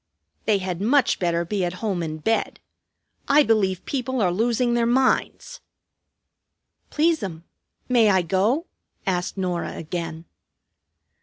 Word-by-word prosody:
"They 215 -2 +3
had 185 -2 -4
much 260 +6 +2
better 170 -1 0
be 195 +1 -2
at 175 0 -1
home 190 -2 -2
in 155 -1 -4
bed. 225 +9 -1 0.7
I 295 +1 +6
believe 200 -6 +1
people 260 -1 -2
are 185 -5 +2
losing 235 +5 +1
their 235 -1 +2
minds!" 265 - 0 1.3
"Please'm, 240 - 0 0.4
may 235 -4 +4
I 190 -2 +3
go?" 205 - +1 0.4
asked 180 -1 -1
Norah 180 -2 -2
again. 165 0 -5
200 Hz, 125 wpm, -23 LUFS, 175-240 Hz, 1.3 s, I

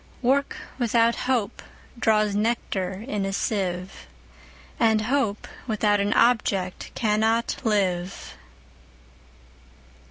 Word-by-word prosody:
Work 275 +3 +1 0.2
without 235 -1 +3
Hope 240 -6 0 0.4
draws 215 -2 +2
nectar 205 -2 -2
in 210 -6 -2
a 195 - -2
sieve, 185 - -3 0.7
And 220 -1 +3
Hope 225 -3 -1 0.2
without 210 -2 +2
an 200 +2 +1
object 205 -6 +1
cannot 220 +1 +1
live. 190 -5 -1
215 Hz, 90 wpm, -25 LUFS, 195-230 Hz, 0.7 s, without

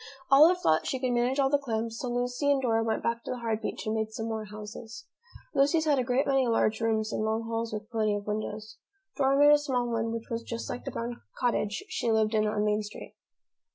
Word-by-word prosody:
Olive 315 +6 +7
thought 155 - +2
she 265 - -1
could 255 -1 0
manage 245 +2 +1
all 270 -1 +2
the 285 - +4
clams, 230 -3 -3
so 255 - -3
Lucy 245 +3 -1
and 280 -1 +4
Dora 225 -3 +1
went 220 -1 -1
back 235 0 -1
to - - -8
the 250 - -2
hard 225 -2 -2
beach - - -4
and 215 - -1
made 220 0 -1
some 225 0 -4
more 220 -1 -3
houses. 215 +2 -9 0.5
Lucy's 290 +4 +3
had 290 -3 +3
a - - +1
great 250 +3 +1
many 270 -2 +2
large 225 -1 +1
rooms 220 -1 0
and - - -1
long 220 +1 0
halls 230 0 -3
with 215 0 -5
plenty 215 -2 +1
of 205 0 -5
windows. 215 +1 -4 0.4
Dora 275 -1 +2
made 290 +1 +7
a 295 - +5
small 255 -4 -1
one 225 0 -1
which 230 0 -5
was 230 0 -2
just 230 0 -5
like 245 - -6
the 270 - -3
brown 240 0 -5 0.2
cottage 220 -4 0
she 235 - -1
lived 220 0 +2
in 215 -1 +2
on 210 0 0
Main 210 0 +1
Street. 210 0 -9
230 Hz, 240 wpm, -28 LUFS, 220-255 Hz, 0.5 s, Olive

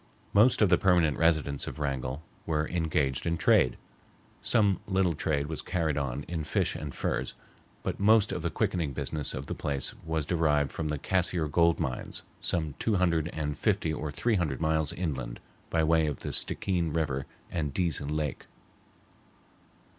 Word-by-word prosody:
Most 110 +2 +5
of 100 - +4
the 90 - +5
permanent 85 -6 +4
residents 80 -4 +2
of - - -6
Wrangell 70 -1 -3 0.2
were 75 -1 0
engaged 75 -5 0
in 85 0 +1
trade. - - +4 0.6
Some 105 -5 +3
little 95 -3 +2
trade 75 -2 0
was 80 +1 -4
carried 80 -5 -1
on 70 -1 -2
in 80 -1 -4
fish 75 - 0
and 75 -2 -5
furs, - - -2 0.5
but - - -3
most 105 +1 +5
of 90 - -2
the 85 - -1
quickening 80 -2 -1
business 75 +2 -1
of 65 +1 -5
the - - -4
place 70 -2 -2
was 80 -2 -1
derived 75 -4 +2
from 80 - -3
the 75 0 -1
Cassiar 85 0 0
gold 85 +2 +3
mines, 65 - -3 0.2
some 80 -4 -1
two 110 - +1
hundred 85 -3 +2
and 75 -2 -3
fifty 80 - +1
or 75 -1 -3
three 115 +10 0
hundred 75 -7 -1
miles 80 -1 +1
inland, 70 -9 -4 0.3
by 80 -1 +2
way 80 0 +3
of 75 -3 -3
the - - -4
Stickeen 85 -5 +1
River 70 -4 -1 0.2
and 75 -4 -1
Dease 85 -2 0
Lake. 75 +1 -3
80 Hz, 170 wpm, -29 LUFS, 75-85 Hz, 0.6 s, Most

